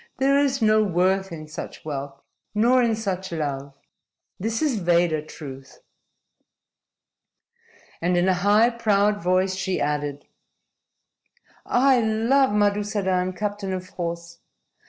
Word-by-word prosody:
There 275 +1 +3
is 275 -3 +1
no 215 0 +4
worth 190 0 +1
in 155 -2 -8
such 155 - -8
wealth 140 -2 -5 0.4
nor 245 +4 +4
in 230 -2 +2
such 190 -4 -4
love. 140 -4 -3 0.7
This 225 +3 -2
is 270 -8 +1
Veda 170 -3 +2
truth." 135 -3 -11 2.2
And 175 +1 +1
in 175 +1 +2
a 190 - +4
high, 210 +4 +4
proud 210 -3 +1
voice 185 +1 +1
she 190 0 -2
added: 145 -1 -2 1.4
"I 260 0 +4
love 230 +5 +2
Madusadan, 205 -3 0
captain 205 0 -3
of 185 0 -5
horse. 170 -2 -6
190 Hz, 115 wpm, -24 LUFS, 170-215 Hz, 2.2 s, no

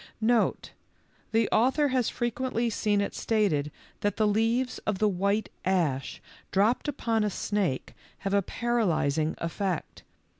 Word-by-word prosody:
Note. 230 +1 +1 0.6
The 225 -1 +3
author 265 +6 +3
has 255 -3 +1
frequently 240 0 -1
seen 205 -1 +1
it 200 - -2
stated 190 -10 +1 0.3
that 205 -2 -1
the 215 - +3
leaves 225 +4 +1
of 210 -2 -2
the 215 - +3
white 200 +2 0
ash 165 -8 0 0.3
dropped 215 +9 +2
upon 230 -6 0
a 210 - +1
snake 195 -8 -2 0.3
have 195 - 0
a 200 - +4
paralyzing 175 - 0
effect. 175 0 -3
210 Hz, 135 wpm, -28 LUFS, 190-235 Hz, 0.6 s, a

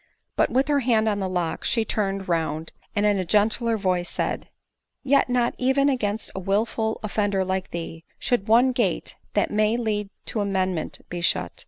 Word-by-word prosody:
But - - +3
with 265 +2 +2
her 290 -1 +3
hand 230 -4 +2
on 205 -2 +1
the 190 -1 -2
lock 175 -3 -2
she 230 -2 +1
turned 195 -3 -1
round, 160 -2 -1 0.2
and 205 0 +2
in 205 -2 +3
a - - 0
gentler 220 +5 +2
voice 185 -3 0
said, - - -2 0.3
" - - -57
Yet 280 +1 +3
riot 245 -1 +2
even 265 +2 +3
against 220 -5 -1
a - - -4
wilful 220 +3 0
offender 205 -2 0
like 190 0 -2
thee, 165 -1 -6
should 235 -4 0
one 240 +4 +5
gate 230 -8 -1 0.2
that 205 - +2
may 215 +2 +2
lead 210 -4 -1 0.2
to 220 - -2
amendment 190 -4 -2
be 175 0 -4
shut. 85 - +2
205 Hz, 185 wpm, -24 LUFS, 185-230 Hz, 0.3 s, one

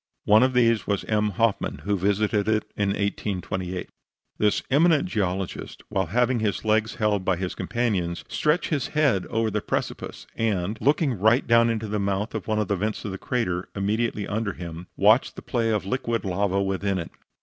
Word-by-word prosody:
One 105 +1 +6
of 130 0 +3
these 115 -3 +3
was 100 -2 0
M. 105 -1 +1
Hoffman, 110 +2 0
who 100 0 +1
visited 100 +2 +1
it 110 -1 +1
in 100 -1 0
1828. 95 -2 -2 0.5
This 105 -1 +2
eminent 160 +3 +4
geologist, 95 - -3
while 95 -3 0
having 120 +6 +2
his 110 0 -1
legs 110 0 +2
held 105 -3 +1
by 95 -1 +2
his 90 0 -3
companions, 100 -8 -1
stretched 155 +4 +1
his 140 -6 0
head 135 -12 +2
over 115 -1 0
the 105 +1 -1
precipice, - - -4
and, 105 -3 0
looking 140 - +2
right 110 +6 +4
down 115 0 +5
into 110 -1 -2
the 105 0 -2
mouth 100 +2 -1
of - - -5
one 110 -1 0
of 105 -2 0
the 100 - +1
vents 105 +3 -2
of 100 - -3
the 95 - -6
crater 95 -8 -2
immediately 105 +1 -1
under 105 -1 -2
him, 85 0 -8
watched 110 +6 +4
the - - -9
play 115 -3 0
of 105 -3 0
liquid 115 0 -1
lava 100 +1 0
within 95 0 -1
it. 85 -2 -5
105 Hz, 185 wpm, -25 LUFS, 95-115 Hz, 0.5 s, One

